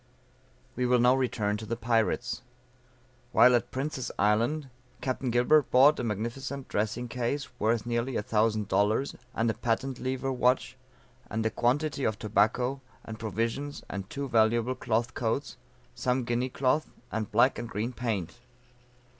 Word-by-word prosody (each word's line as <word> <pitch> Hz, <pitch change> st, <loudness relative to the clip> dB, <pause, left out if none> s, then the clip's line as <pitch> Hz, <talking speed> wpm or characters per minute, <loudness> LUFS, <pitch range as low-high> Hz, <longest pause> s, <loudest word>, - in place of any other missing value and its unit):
We 125 Hz, 0 st, 0 dB
will 125 Hz, 0 st, +4 dB
now 125 Hz, +1 st, +5 dB
return 110 Hz, -5 st, 0 dB
to 110 Hz, -, -7 dB
the 115 Hz, -, -1 dB
pirates. 115 Hz, -1 st, 0 dB, 0.9 s
While 125 Hz, -, +7 dB
at 120 Hz, 0 st, +1 dB
Prince's 130 Hz, -1 st, -3 dB
Island, 115 Hz, +9 st, +2 dB, 0.3 s
Capt. 130 Hz, 0 st, -2 dB
Gilbert 125 Hz, +5 st, +4 dB
bought 140 Hz, +4 st, +6 dB
a -, -, -2 dB
magnificent 120 Hz, +5 st, -4 dB
dressing 110 Hz, +4 st, -1 dB
case 125 Hz, +4 st, -2 dB
worth 110 Hz, +1 st, +1 dB
nearly 120 Hz, +2 st, -1 dB
a -, -, 0 dB
thousand 110 Hz, -1 st, +1 dB
dollars 105 Hz, +8 st, +1 dB, 0.2 s
and 115 Hz, -, +1 dB
a 110 Hz, -, +2 dB
patent 125 Hz, +3 st, -2 dB
lever 130 Hz, +1 st, -2 dB
watch, 125 Hz, +1 st, +1 dB, 0.5 s
and 110 Hz, +1 st, -2 dB
a 110 Hz, -, +1 dB
quantity 140 Hz, +4 st, 0 dB
of 110 Hz, -3 st, 0 dB
tobacco, 110 Hz, +6 st, +1 dB, 0.2 s
and 110 Hz, -1 st, -7 dB
provisions, 115 Hz, +7 st, -3 dB
and 100 Hz, +1 st, -5 dB
two 140 Hz, 0 st, -4 dB
valuable 115 Hz, +1 st, +2 dB
cloth 120 Hz, -1 st, -1 dB
coats, 120 Hz, +5 st, -2 dB, 0.4 s
some 125 Hz, 0 st, 0 dB
Guinea 120 Hz, +2 st, -1 dB
cloth 135 Hz, +4 st, +1 dB, 0.2 s
and 110 Hz, -2 st, -3 dB
black 120 Hz, +5 st, +4 dB
and 120 Hz, -, -5 dB
green 115 Hz, +4 st, -3 dB
paint. 115 Hz, -5 st, -3 dB
120 Hz, 150 wpm, -29 LUFS, 110-130 Hz, 0.9 s, While